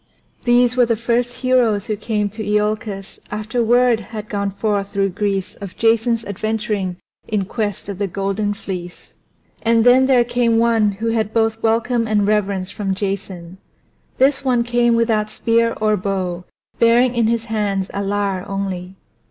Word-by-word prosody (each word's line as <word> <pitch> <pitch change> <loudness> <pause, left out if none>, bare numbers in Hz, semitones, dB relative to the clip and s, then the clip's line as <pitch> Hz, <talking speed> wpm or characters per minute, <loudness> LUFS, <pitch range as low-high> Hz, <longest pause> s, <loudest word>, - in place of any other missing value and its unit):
These 245 0 +4
were 245 -2 +4
the 230 - +2
first 235 +2 0
heroes 235 -5 +2
who 215 - -2
came 210 0 -1
to 220 0 -6
Iolcus 210 -1 -2
after 215 +3 -3
the - - +3
word 245 0 +4
had 215 0 -8
gone 200 -1 -1
forth 200 0 -2
through 195 -1 +1
Greece 195 0 -2
of 195 -3 -8
Jason's 230 0 +2
adventuring 205 -2 -2 0.3
in 210 -3 -1
quest 205 -2 -3
of 200 -2 -6
the 200 - 0
Golden 200 +2 -2
Fleece. 180 -3 -8 0.5
And 230 -1 +3
then 255 +2 +5
there 255 -3 +5
came 240 -1 +1
one 225 -3 +3
who 225 +4 -3
had 220 -1 -1
both 225 0 +1
welcome 230 +1 +1
and 210 -2 +2
reverence 200 -3 0
from 195 -2 -2
Jason; 190 -3 -5 0.6
this 270 +1 +3
one 250 -3 +2
came 240 0 +2
without 225 -2 +1
spear 230 +1 +1
or 215 -1 +2
bow, 185 -3 -3 0.3
bearing 235 +2 +4
in 235 -2 +2
his 230 0 0
hands 205 -3 -2
a 200 - -2
lyre 200 -2 -1
only. 190 -2 -4
215 Hz, 165 wpm, -19 LUFS, 200-230 Hz, 0.6 s, then